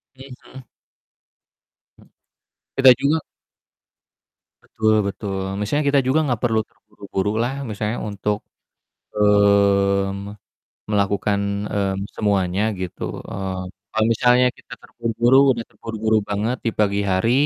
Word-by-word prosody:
Mhm 130 -1 -11
mhm. 130 -3 -13 1.3
Hmm. - - -20 0.7
Kita 135 -1 +8
juga 150 +3 +1 1.5
Betul 110 0 0
betul, 95 0 -4 0.2
misalnya 145 +8 0
kita 140 -1 +4
juga 135 +4 +3
gak 120 -1 -2
perlu 110 -2 +2
terburu-buru 105 -1 -5
lah 130 +3 -1 0.2
misalnya 105 +2 -3
untuk, 105 +1 -2 0.8
mmm, 100 -1 +2 0.5
melakukan, 100 0 +1 0.3
mmm, 95 -1 -1 0.2
semuanya 100 -2 0 0.2
gitu, 90 -2 -6 0.3
mmm, 95 -1 -4 0.3
kalau 110 0 +2
misalnya 125 +2 +4
kita - - -13
terburu-buru, 120 +2 +1 0.2
udah 115 - -5
terburu-buru 110 -1 -1
banget 110 +5 -1
di 115 - +1
pagi 100 -1 +2
hari, 95 +6 +2
105 Hz, 110 wpm, -21 LUFS, 100-115 Hz, 1.5 s, Kita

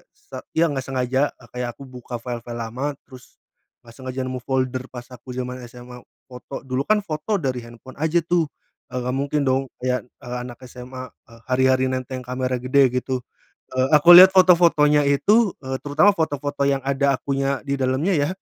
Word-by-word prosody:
sa - - -11 0.2
iya, 165 - +4
nggak 135 -5 -3
sengaja, 130 0 0 0.2
e 120 - -18
kayak 125 -1 -3
aku - - -12
buka 125 -1 -8
file-file 120 0 -6
lama 130 +6 -4
terus 130 -2 -16 0.4
nggak 115 -1 -17
sengaja 130 +1 -6
nemu 130 0 -4
folder 130 -1 -1
pas 120 -1 -9
aku 125 +1 -13
zaman 125 0 -5
SMA 125 0 -12 0.2
foto, 125 +1 -9
dulu 130 +1 -1
kan 215 +6 +2
foto 165 +4 -2
dari 130 -7 -3
handphone 120 +2 -13
aja 160 +2 +2
tuh, 170 -3 +1 0.4
e 125 - -13
nggak 125 +1 -2
mungkin 140 +2 -1
dong 130 +1 +2 0.2
ya, 125 0 -1
e 125 - -20 0.2
anak 125 -1 -9
SMA, 130 +1 -9 0.2
e - - -17
hari-hari 130 0 +2
nenteng 130 0 -3
kamera 125 0 -2
gede 130 +1 +3
gitu, 125 0 -2 0.5
e 130 - -6 0.2
aku 170 +4 +8
lihat 190 +1 +9
foto-fotonya 165 -5 +5
itu, 205 +9 +3
eee, 130 0 -4
terutama 155 +8 +4
foto-foto 145 -3 -1
yang 135 -1 +1
ada 140 0 +1
akunya 135 0 -2
di 140 -1 -3
dalamnya 135 +8 0
ya, 145 - +1
130 Hz, 180 wpm, -22 LUFS, 125-145 Hz, 0.5 s, lihat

